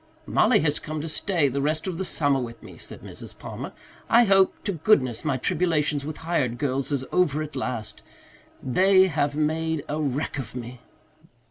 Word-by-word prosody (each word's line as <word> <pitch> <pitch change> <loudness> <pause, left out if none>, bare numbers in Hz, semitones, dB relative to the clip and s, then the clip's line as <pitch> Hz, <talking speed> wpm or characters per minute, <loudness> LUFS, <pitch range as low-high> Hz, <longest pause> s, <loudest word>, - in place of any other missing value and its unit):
"Mollie - - +3
has 150 -1 +1
come 155 0 -5
to 160 - -5
stay 165 -1 +1
the 140 +1 -2
rest 155 +2 -1
of 185 -3 -4
the 190 - -1
summer 145 -5 +1
with 115 -2 -7
me," - - -11
said - - -11
Mrs. - - -10
Palmer. - - -7 0.4
"I 235 +1 +6
hope 195 -3 +4
to 205 - -1
goodness 145 - +2
my 145 -4 0
tribulations 150 -1 +1
with 155 0 -5
hired 135 -8 0
girls 135 0 -1
is 135 -2 -1
over 155 -4 +2
at 150 -1 -9
last. 125 -5 -4 0.6
They 185 +8 +5
have 145 -5 0
made 160 0 -1
a 150 +2 -2
wreck 145 0 -2
of 120 -2 -7
me." 120 0 -7
150 Hz, 185 wpm, -25 LUFS, 135-165 Hz, 0.6 s, I